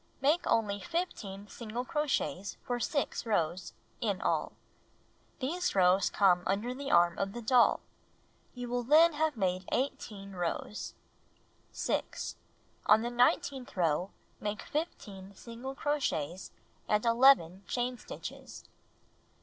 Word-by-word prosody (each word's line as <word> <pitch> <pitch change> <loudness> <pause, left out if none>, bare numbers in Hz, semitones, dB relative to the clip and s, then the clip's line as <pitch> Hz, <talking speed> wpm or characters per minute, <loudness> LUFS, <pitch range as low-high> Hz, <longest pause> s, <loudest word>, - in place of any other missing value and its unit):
Make 300 +6 +2
only 205 -3 +1
15 205 - -4
single 235 +3 -5
crochets 285 - -1
for 245 -1 -2
6 285 +3 -1
rows 175 -4 0 0.3
(in 205 -5 0
all). - - 0 0.8
These 320 - -1
rows 185 +1 +4
come 185 -3 +4
under 210 +6 0
the 275 +2 -5
arm 175 0 +4
of 195 0 -1
the 240 - -5
doll. 245 +1 +4 0.7
You 245 0 -5
will 245 +1 -1
then 310 +7 +6
have 305 -2 0
made 185 -2 -1
18 210 -6 -3
rows. 180 +3 -4 0.8
6. - - -2 0.5
On 215 +2 +6
the 240 - -2
nine 245 +1 +4
teenth 265 -7 -8
row, 175 +1 +1 0.3
make 210 -1 -3
15 200 - -5
single 240 +5 -8
crochets 220 - -2 0.4
and 210 +2 +1
11 230 -7 +5
chain 250 +3 -1
stitches. - - -9
225 Hz, 125 wpm, -31 LUFS, 195-265 Hz, 0.8 s, then